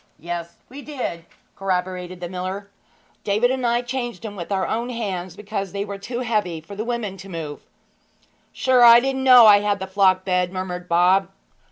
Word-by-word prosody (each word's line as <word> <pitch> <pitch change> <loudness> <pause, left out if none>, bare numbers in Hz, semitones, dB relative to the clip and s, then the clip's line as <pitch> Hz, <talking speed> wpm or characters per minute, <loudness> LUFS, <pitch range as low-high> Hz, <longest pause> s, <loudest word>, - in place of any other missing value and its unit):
'Yes, 170 +2 -6
we 275 +3 -10
did,' 255 - -5 0.3
corroborated 185 -1 -3
the 175 - -4
miller. 185 +3 -6 0.5
'David 215 +5 +2
and 260 -2 -1
I 240 +1 +1
changed 240 -5 -5
'em 205 -2 -6
with 175 0 -7
our 190 -1 0
own 235 +2 -2
hands, 190 -7 -4
because 200 -2 -5
they 200 0 -2
were 200 -1 -7
too 240 +5 -5
heavy 210 -8 -1
for 180 +6 -11
the 210 - -3
women 230 -5 -3
to 195 +1 -11
move.' 160 -4 -6 0.9
'Sure 255 -2 +3
I 235 0 +9
didn't 265 +1 -2
know 250 -3 +8
I 205 -1 +8
had 205 0 0
the 190 - -5
flock 190 -1 +2
bed,' 180 -1 0
murmured 180 -1 -5
Bob. 180 +3 +3
200 Hz, 185 wpm, -22 LUFS, 180-235 Hz, 0.9 s, I